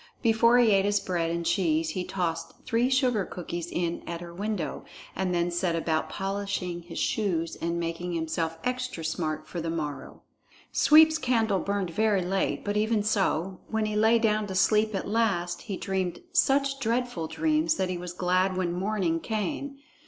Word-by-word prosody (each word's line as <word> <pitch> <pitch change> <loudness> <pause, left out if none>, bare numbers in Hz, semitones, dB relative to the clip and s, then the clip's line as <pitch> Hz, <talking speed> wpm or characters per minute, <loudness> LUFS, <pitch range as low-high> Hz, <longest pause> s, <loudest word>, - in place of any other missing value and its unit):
Before 230 +1 +5
he 240 -3 +5
ate 195 -1 +4
his 205 0 +2
bread 170 -3 -1
and 170 0 -2
cheese, 165 -3 +1
he 185 +2 -3
tossed 175 -3 -4
three 240 +1 +2
sugar 255 -5 +2
cookies 175 -1 -5
in 170 -1 -2
at 170 0 -4
her 170 0 -9
window, 200 -3 -3 0.3
and 190 -1 -1
then 175 0 +1
set 175 0 0
about 160 -1 -1
polishing 195 -3 -3
his 170 0 -10
shoes 170 -6 0
and 170 +1 -2
making 170 +1 -3
himself 165 0 -2
extra 250 -9 -3
smart 160 -1 -2
for 175 - -5
the 165 - -3
morrow. 155 -3 -5 0.5
Sweep's 315 +1 +6
candle 225 -7 +1
burned 200 -3 -2
very 210 0 +2
late; 190 +1 -1
but 205 0 0
even 215 0 +1
so, 195 -3 0
when 220 -1 -1
he 215 0 -2
lay 220 +2 +5
down 215 -2 +1
to 190 - -5
sleep 215 +2 +3
at 195 - -3
last, 195 -5 0
he 200 -4 -5
dreamed 190 - -2
such 275 -4 +2
dreadful 235 -8 -1
dreams 310 - +1
that 190 -8 -1
he 180 - -2
was 180 0 -6
glad 185 +1 +1
when 175 -2 0
morning 185 -3 0
came. 275 - -3
190 Hz, 175 wpm, -27 LUFS, 170-220 Hz, 0.5 s, Sweep's